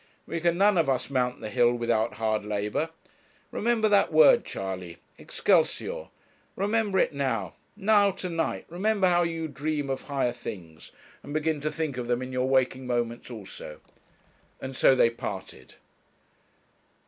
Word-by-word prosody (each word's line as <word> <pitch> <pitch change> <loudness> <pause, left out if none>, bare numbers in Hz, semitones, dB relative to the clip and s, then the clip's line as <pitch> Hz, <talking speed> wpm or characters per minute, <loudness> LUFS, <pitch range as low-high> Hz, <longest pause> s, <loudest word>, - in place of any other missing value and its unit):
We 170 - -3
can 170 +1 +1
none 200 -1 +4
of 155 -4 +2
us 130 +1 -1
mount 125 -2 0
the 110 - -5
hill 120 0 +4
without 115 -1 0
hard 110 -1 0
labour. 105 +9 -2 0.6
Remember 225 -1 +1
that 205 -4 +3
word, 235 - +6
Charley 95 -3 -5 0.2
Excelsior! 205 - 0 0.5
Remember 205 0 0
it 180 - +2
now 140 -2 -2 0.2
now, 205 0 +4
to 190 -1 -5
night; 165 -2 -2
remember 195 +3 +1
how 175 -1 +4
you 165 -1 -2
dream 145 0 -3
of 135 - -3
higher 135 -4 0
things, 90 -9 -9 0.3
and 145 - -8
begin 155 -1 0
to 155 +1 -1
think 155 -5 -3
of 120 -1 -4
them 120 +1 0
in 130 0 -7
your 130 +1 0
waking 130 -1 +1
moments 120 -1 -2
also;' 100 -9 -9 0.8
and 130 0 -6
so 135 - +5
they 115 -2 +4
parted. 95 - -7
135 Hz, 155 wpm, -27 LUFS, 120-175 Hz, 0.8 s, word